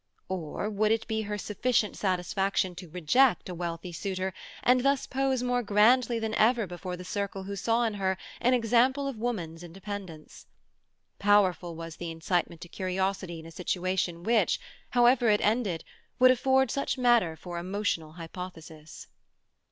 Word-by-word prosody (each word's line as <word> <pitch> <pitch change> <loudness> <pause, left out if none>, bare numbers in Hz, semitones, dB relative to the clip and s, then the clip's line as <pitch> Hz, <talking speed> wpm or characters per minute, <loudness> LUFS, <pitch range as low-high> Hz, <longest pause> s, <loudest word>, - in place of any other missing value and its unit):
Or 185 +1 -3
would 215 0 +1
it 225 0 0
be 220 -1 -1
her 210 -1 -3
sufficient 210 +2 0
satisfaction 190 0 0
to 180 -1 -10
reject 180 - +3
a - - -4
wealthy 170 0 -5
suitor, 190 +2 -3 0.3
and 250 0 +4
thus 275 0 +2
pose 265 -1 0
more 245 0 +1
grandly 230 +3 +4
than 220 -1 -2
ever 230 +1 +3
before 180 0 -6
the 180 - -9
circle 200 0 -3
who 200 +1 -5
saw 230 +4 +1
in 225 -2 0
her 190 -2 -1 0.2
an 250 +1 +3
example 250 +4 +2
of 260 -5 -5
woman's 175 -9 -3
independence? 185 -2 -8 0.7
Powerful 190 -4 +3
was 165 0 -8
the 175 - -5
incitement 165 0 -2
to - - -8
curiosity 185 -1 -2
in 160 - -11
a 165 - -10
situation 180 0 -2
which, 225 +2 +2 0.3
however 245 -1 +4
it 210 -1 +4
ended, 210 -6 0 0.3
would 255 0 +7
afford 265 -1 +3
such 275 0 -1
matter 240 -10 +3
for 175 +1 -6
emotional 180 -4 -2
hypothesis. 165 -2 -9
200 Hz, 155 wpm, -28 LUFS, 175-235 Hz, 0.7 s, would